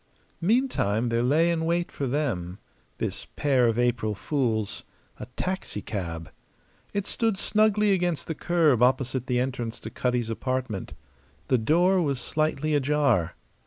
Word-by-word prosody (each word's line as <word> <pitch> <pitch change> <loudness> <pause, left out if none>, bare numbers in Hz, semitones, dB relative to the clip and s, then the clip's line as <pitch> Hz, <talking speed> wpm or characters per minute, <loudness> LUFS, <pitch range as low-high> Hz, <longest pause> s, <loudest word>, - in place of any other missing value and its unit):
Meantime, 170 - +1
there 115 0 +1
lay 155 +7 +3
in 165 -1 -1
wait 170 +1 0
for 140 - -3
them 115 - -2 0.4
this - - -4
pair 130 -4 +3
of 115 0 +1
April 120 -3 +1
fools 110 -5 -1 0.4
a - - -7
taxicab. 100 - -4 0.6
It 200 -1 -2
stood 225 -2 0
snugly 210 0 +3
against 175 -4 0
the 160 - -3
curb 155 -6 +2
opposite 130 0 +2
the 125 -1 +1
entrance 125 -3 -3
to - - -7
Cutty's 120 -2 -1
apartment. 130 -4 -3 0.6
The 130 - +4
door 175 +10 +3
was 140 -5 0
slightly 155 +1 0
ajar. 145 - +2
135 Hz, 135 wpm, -26 LUFS, 115-170 Hz, 0.6 s, The